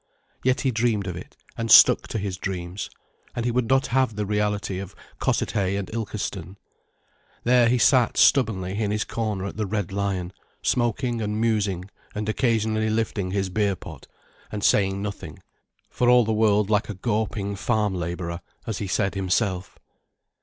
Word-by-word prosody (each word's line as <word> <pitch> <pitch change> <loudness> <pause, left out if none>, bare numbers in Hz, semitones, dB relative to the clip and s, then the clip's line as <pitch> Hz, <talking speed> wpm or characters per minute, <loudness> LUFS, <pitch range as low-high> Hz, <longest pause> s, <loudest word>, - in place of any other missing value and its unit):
Yet 130 0 +2
he 130 - +1
dreamed 110 -3 0
of 90 -2 -4
it, 90 - -10 0.2
and 115 0 -3
stuck - - +8
to - - -4
his 100 -3 -3
dreams, 90 0 -4 0.5
and 120 - -2
would 120 -1 0
not 135 0 +3
have 130 -4 +2
the 105 0 -2
reality 105 -2 -1
of 100 0 -8 0.2
Cossethay 100 -2 0
and 100 -2 -4
Ilkeston. 100 -4 -4 0.9
There 120 -1 +4
he 125 - +3
sat 125 -1 +4
stubbornly 100 -7 +3
in 105 - 0
his 105 +1 0
corner 105 -4 -3
at 100 - -6
the 105 -2 -1
"Red 105 -2 -2
Lion", 95 -2 -2 0.3
smoking 120 0 0
and 105 0 -2
musing 105 -5 0 0.3
and 105 0 -3
occasionally 110 -1 +1
lifting 110 -3 -1
his 95 0 -1
beer 100 0 +1
pot, 80 -5 -11 0.4
and 105 -1 -4
saying 95 -1 +2
nothing, 105 -1 -6 0.5
for 125 - +2
all 125 -1 +6
the 110 - 0
world 105 -1 +2
like 105 0 +1
a 105 - -4
gorping 105 -1 -2
farm 105 -1 0
labourer, 85 -1 -4 0.2
as 110 -4 -3
he 100 - -3
said 100 +1 0
himself. 95 0 -1
105 Hz, 165 wpm, -24 LUFS, 95-115 Hz, 0.9 s, stuck